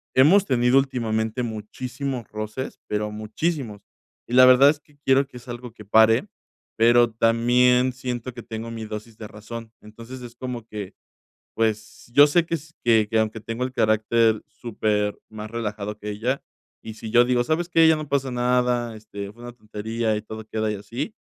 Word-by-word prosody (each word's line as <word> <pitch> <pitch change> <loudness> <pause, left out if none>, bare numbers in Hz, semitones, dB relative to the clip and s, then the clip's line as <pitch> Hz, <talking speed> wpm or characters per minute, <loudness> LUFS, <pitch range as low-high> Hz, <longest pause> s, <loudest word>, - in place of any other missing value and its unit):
Hemos 175 +10 +6
tenido 125 -2 +3
últimamente 115 -3 0
muchísimos 125 +3 -5
roces, 110 +4 -5
pero 105 0 -2
muchísimos, 110 +1 -3 0.4
y 120 - -8
la 130 0 +9
verdad 130 +2 +7
es 145 0 0
que 145 -1 -27
quiero 135 +1 +4
que 135 - -20
es 120 - -14
algo 120 -1 -7
que 110 - -13
pare, 110 - +4 0.5
pero 120 +1 +5
también 120 +3 +3
siento 125 -1 -5
que 120 - -8
tengo 115 +1 -6
mi 115 -1 -6
dosis 110 +1 -8
de 110 - -8
razón. 110 +2 -9
Entonces, 115 +4 -11
es 120 -1 -10
como 120 -2 -6
que, 105 -3 -7 0.6
pues, 110 +1 -2
yo 145 +2 +8
sé 165 +3 +2
que 165 - -1
s 160 0 -10
que 110 -3 +4
que 110 - +1
aunque 110 0 -1
tengo 115 +3 -4
el 130 - -3
carácter 110 0 +2
supermás 105 -1 -3
relajado 105 -2 -4
que 105 0 -7
ella, 120 +6 -2 0.4
y 110 - -7
si 110 +1 -8
yo 120 +1 +6
digo: 125 -1 +2
"¿Sabes 160 +6 -1
qué? 165 -2 +5
Ya 160 - +6
no 155 -1 -5
pasa 135 -1 0
nada, 125 -1 +1
este, 100 -2 -8
fue 120 - -17
una 120 - -7
tontería 110 0 -3
y 105 - -3
todo 110 0 -9
queda 110 0 -2
y - - -3
así". 120 - -6
115 Hz, 185 wpm, -24 LUFS, 110-125 Hz, 0.6 s, la